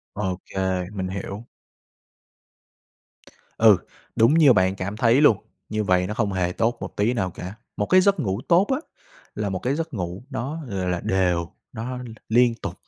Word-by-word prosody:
OK, 95 -1 -4 0.4
mình 95 -2 -3
hiểu. 100 +3 -6 2.1
Ừ, 110 -4 +7 0.4
đúng 115 +7 +5
như 150 -6 +7
bạn 95 -1 +2
cảm 100 +3 -5
thấy 120 +5 +4
luôn, 115 -9 +6 0.3
như 110 0 -1
vậy 90 -1 +2
nó 105 - -3
không 105 -4 -1
hề 90 -1 0
tốt 115 +5 0
một - - -7
tí 110 +5 +1
nào 95 -7 -1
cả. 90 +3 -7 0.2
Một 105 - 0
cái 185 0 +5
giấc 200 -2 +3
ngủ 100 -3 -1
tốt 180 +4 +4
á 265 - +1 0.6
là 105 -2 -2
một 95 -1 -3
cái 130 +3 -1
giấc 165 -2 -4
ngủ 90 +2 -4
nó, 135 +5 -4
gọi 95 -2 -2
là, 90 -1 -1
đều, 90 -3 0 0.2
nó 125 +3 -5
l 125 - -7 0.3
liên 120 +1 +4
tục, - - -4
105 Hz, 180 wpm, -24 LUFS, 95-125 Hz, 2.1 s, Ừ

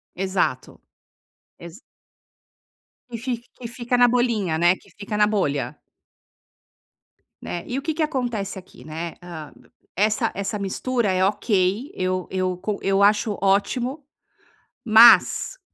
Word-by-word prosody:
Exato, 185 -8 -2 0.8
exa 170 +6 -12 1.3
Que 230 - -5
fi 255 - -1 0.3
que 245 - -7
fica 240 0 -3
na 245 - +6
bolhinha, 225 -9 +1
né, 175 - +6
que - - -22
fica 210 +1 -4
na 210 - +5
bolha. 140 -8 0 1.8
Né, 175 - -5
e 250 - -4
o 275 - -3
que 315 +2 -1
que 320 - -2
acontece 240 -10 -3
aqui, 185 - -15
né? 165 +2 -6
Ah, 165 -4 -9 0.4
essa 215 +4 +1
essa 200 +2 -3
mistura 225 +2 -1
é 185 0 +2
ok. 200 +4 0
Eu 185 0 -2
eu 185 -1 -1
co 200 +2 -4
eu 195 0 +2
acho 210 0 +3
ótimo, 245 +8 0 0.8
mas 235 - +6
200 Hz, 130 wpm, -23 LUFS, 185-240 Hz, 1.8 s, na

